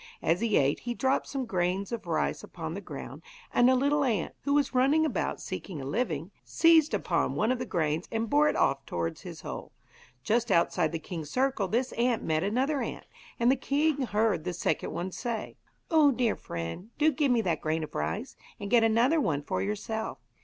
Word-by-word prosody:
As 170 +4 +2
he 230 -2 +2
ate 140 +1 +2
he 240 0 -4
dropped 265 +2 +1
some 270 -2 -3
grains 185 0 -1
of 235 -2 -5
rice - - -1
upon - - -6
the - - -5
ground, - - -8 0.3
and 245 +1 +5
a 260 - +5
little 285 +3 +2
ant, 220 -10 0
who 280 - +2
was 290 -1 +2
running 275 +5 +4
about 310 - -1
seeking 180 -7 -6
a 135 - -6
living, 165 - -2
seized 320 - +4
upon - - 0
one 220 +3 +2
of 255 - -1
the 250 - -4
grains 160 -1 -1
and 225 0 -1
bore 295 +4 +4
it - - -1
off 135 0 +2
towards 85 -1 -3
his - - -9
hole. - - -7 0.5
Just 235 - +1
outside 170 -1 +2
the 165 - -2
king's 160 -2 -7
circle 255 - +1
this 240 +6 0
ant 240 -1 0
met 155 -1 +1
another 260 +8 0
ant, - - -5 0.3
and 240 +2 +4
the - - +4
king 290 +1 +1
heard 215 -7 +1
the 180 +1 -3
second 175 - -1
one 185 +2 -3
say: 230 +2 -4 0.4
'Oh, 310 -3 +6
dear 245 -3 +1
friend, 85 - -6
do 310 +1 +4
give 290 0 +1
me 240 -2 +3
that 170 -7 -1
grain 160 +1 -1
of 155 - -8
rice, 75 +2 -3 0.2
and 200 0 -6
get 235 -2 +6
another 240 +8 +3
one 145 - 0
for - - -2
yourself. 220 +2 -3
225 Hz, 205 wpm, -29 LUFS, 170-260 Hz, 0.5 s, Oh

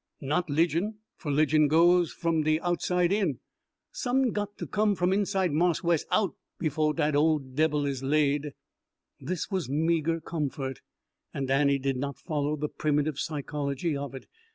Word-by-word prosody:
Not 155 +6 -1
'ligion, 170 +7 +1 0.2
fer 155 - -7
'ligion 150 +1 +3
goes 170 +3 +4
f'm 165 -2 0
de 155 +1 +2
outside 175 0 +1
in. 195 - +1 0.5
Som'n 260 - +1
got 205 0 -4
to - - -5
come 210 -1 +1
from 180 +1 +1
inside 195 -3 +1
Marse 170 +4 +1
Wes 170 -2 +1
out 205 -3 +1 0.2
befo' 155 -1 0
dat 150 -2 0
ole 155 +2 +4
debbil 145 +2 0
is 135 -2 -2
laid." 145 +1 +1 0.7
This 185 +3 -4
was 185 -8 -2
meagre 165 +2 +1
comfort, 140 -5 -4 0.6
and 135 -1 -2
Annie 140 0 +3
did 135 -1 -1
not 140 0 -4
follow 150 +1 -2
the 150 0 -2
primitive 150 -1 -1
psychology 145 0 -2
of 140 -1 -5
it. 135 - -9
155 Hz, 155 wpm, -28 LUFS, 145-175 Hz, 0.7 s, goes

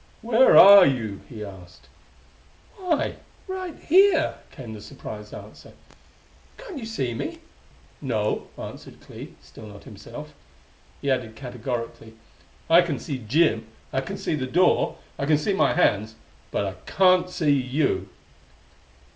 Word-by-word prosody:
"Where 235 +3 +5
are 200 0 +10
you?" 115 - -1
he 110 -4 -7
asked. 95 -3 -14 0.9
"Why 360 -5 -1 0.3
right 370 -3 -6
here!" 360 -1 +4 0.2
came 120 -4 -10
the 105 - -9
surprised 105 0 -9
answer. - - -12 0.8
"Can't 415 - -9
you 225 - -7
see 135 - -3
me?" 115 - -5 0.6
"No," - - -2
answered - - -10
Clee, - - -11
still 110 - -13
not 100 -1 -13
himself. - - -11 0.7
He 140 - +1
added 120 -4 -2
categorically: 120 -2 -6 0.5
"I 170 +2 +7
can 170 -5 -2
see 140 -5 -5
Jim. 115 -1 +1 0.3
I 135 - 0
can 135 - -6
see - - -3
the 130 -4 -2
door. 180 +7 +2 0.2
I 140 - -2
can 150 -1 +4
see 155 +7 -1
my 195 - +2
hands, 110 - +1 0.3
but 100 - -1
I 95 - -4 0.2
can't 185 -1 +4
see 155 -5 +1
you." 135 +2 0
135 Hz, 140 wpm, -24 LUFS, -, 0.9 s, are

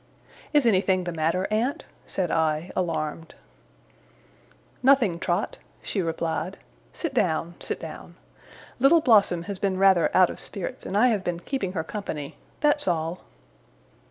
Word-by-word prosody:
'Is 295 -4 +3
anything 190 -3 +3
the 175 - -3
matter, 165 +3 0
aunt?' 235 +6 0 0.2
said 185 -3 -2
I, 160 +1 0
alarmed. 165 -2 -3 1.5
'Nothing, 250 -10 +4
Trot,' - - -1 0.3
she 195 - -1
replied. 165 +2 -2 0.3
'Sit 330 -5 -4
down, 170 -7 0
sit - - -4
down. - - -9 0.6
Little 280 +6 +6
Blossom 205 - +4
has 200 0 -6
been 195 -2 0
rather 190 -3 +5
out 185 -2 +6
of - - -9
spirits, 195 -4 -6
and 195 - -1
I 250 +4 +5
have 210 -5 0
been 175 -1 -2
keeping 190 -2 -3
her 160 -4 -2
company. 160 -6 -5 0.3
That's 295 -3 +2
all. 165 0 -1
185 Hz, 140 wpm, -25 LUFS, 165-215 Hz, 1.5 s, Little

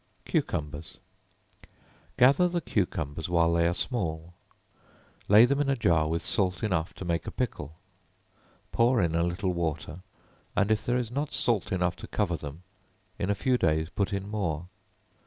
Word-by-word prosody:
Cucumbers. 75 +1 -2 1.2
Gather 140 +8 +5
the 175 0 -1
cucumbers 80 - -2
while 85 -1 +3
they 85 0 +3
are 85 - +1
small, 85 -8 -3 0.9
lay 105 +4 +8
them 140 +3 +1
in 140 - 0
a 135 - +3
jar 85 -9 +2
with 80 +1 -2
salt 95 -1 0
enough 90 -6 0
to 95 - -7
make 85 -2 -1
a - - -3
pickle; 80 - -4 1.0
pour 120 +1 +3
in 85 -4 +1
a 85 - +2
little 90 +2 -1
water, 80 -1 -3 0.6
and 105 +1 +2
if 110 - +1
there 120 +1 +2
is 120 -2 -3
not 140 +3 -2
salt 120 -5 0
enough 90 -2 0
to - - -9
cover 95 -5 0
them, 75 +2 -8 0.6
in 95 - -1
a 100 - +2
few 125 +4 +1
days 80 0 +1
put 100 0 -1
in 100 0 -3
more. 90 -7 -2
90 Hz, 165 wpm, -28 LUFS, 80-110 Hz, 1.2 s, lay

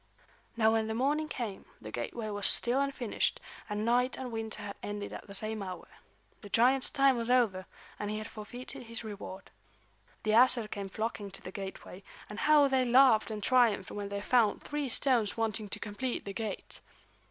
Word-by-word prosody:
Now 220 -1 +4
when 220 -1 +1
the 220 - -3
morning 290 +5 0
came 230 -9 -5
the 110 - -9
gateway 215 - -4
was 205 -1 +4
still 245 +3 +5
unfinished, 270 -5 -1 0.3
and 210 +1 -2
night 245 +2 +2
and 255 -2 -6
winter 225 -1 -5
had 200 -1 -6
ended 205 0 -5
at - - -9
the 200 - 0
same 215 +2 +3
hour. 185 -2 -7 0.5
The 205 - -10
giant's 255 +5 +4
time 275 -2 +3
was 230 0 -3
over, 220 -7 +2 0.3
and 210 - -3
he 215 - -3
had 215 - -5
forfeited 240 +4 -8
his 230 +1 -1
reward. 200 -2 -9 0.7
The 215 - 0
Æsir 235 -1 +4
came 200 -2 -5
flocking 215 0 -4
to 195 - -10
the 185 - -7
gateway, 195 -1 -8 0.3
and 210 - -7
how 300 -2 +5
they 265 -1 +2
laughed 250 -3 +5
and 215 -2 -5
triumphed 235 -6 +2
when 205 -1 -5
they 200 0 -4
found 225 -1 +2
three 290 -2 -3
stones 235 -4 +2
wanting 220 -2 -2
to - - -2
complete 240 +5 -4
the 200 - -5
gate! 215 -2 -5
220 Hz, 185 wpm, -30 LUFS, 205-250 Hz, 0.7 s, still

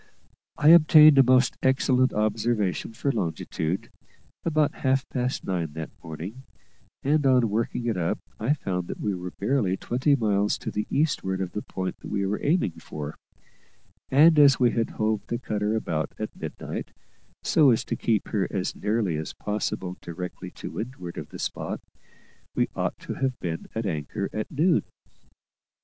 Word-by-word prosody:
I 150 - +5
obtained 155 -3 +8
a - - +9
most 130 0 +3
excellent 130 -1 +3
observation 105 -2 0
for 140 +5 -1
longitude, 85 -4 -3 0.5
about 155 -3 +2
half 130 0 +1
past 125 0 -2
nine 85 -5 -2
that 80 0 -6
morning, 85 +10 -7 0.6
and 145 +2 +2
on 125 -5 +4
working 115 +2 -1
it 115 -5 0
up 85 -2 0 0.2
I 125 +7 +2
found 90 - -3
that - - -6
we 105 - -1
were 90 -1 -5
barely 100 -2 0
twenty 130 +7 +1
miles 105 -4 +1
to - - -5
the 105 - -2
eastward 135 -10 0
of 95 -2 -3
the 105 - -3
point 95 -2 -5
we 100 -1 -1
were 100 +2 -2
aiming 145 - +1
for: 75 0 -7 0.9
and 155 +3 +6
as 140 -2 +7
we 120 -2 +4
had 115 -1 0
hove 110 -1 -1
the 120 - -1
cutter 105 -3 -1
about 80 -9 -2
at - - -5
midnight, - - -6 0.5
so 150 -4 +5
as 115 - +3
to - - -2
keep 110 -4 0
her 100 -3 0
as 95 -1 -2
nearly 105 -6 0
as 80 - -5
possible 95 -3 -3
directly 90 +1 -6
to - - -8
windward 110 -8 -6
of - - -8
the - - -9
spot, - - -3 0.8
we - - +1
ought - - -1
to - - -5
have 130 -2 -2
been 85 -2 -4
at 115 0 -2
anchor 85 +2 -3
at 110 - -3
noon. 165 +4 +3
110 Hz, 165 wpm, -26 LUFS, 95-130 Hz, 0.9 s, a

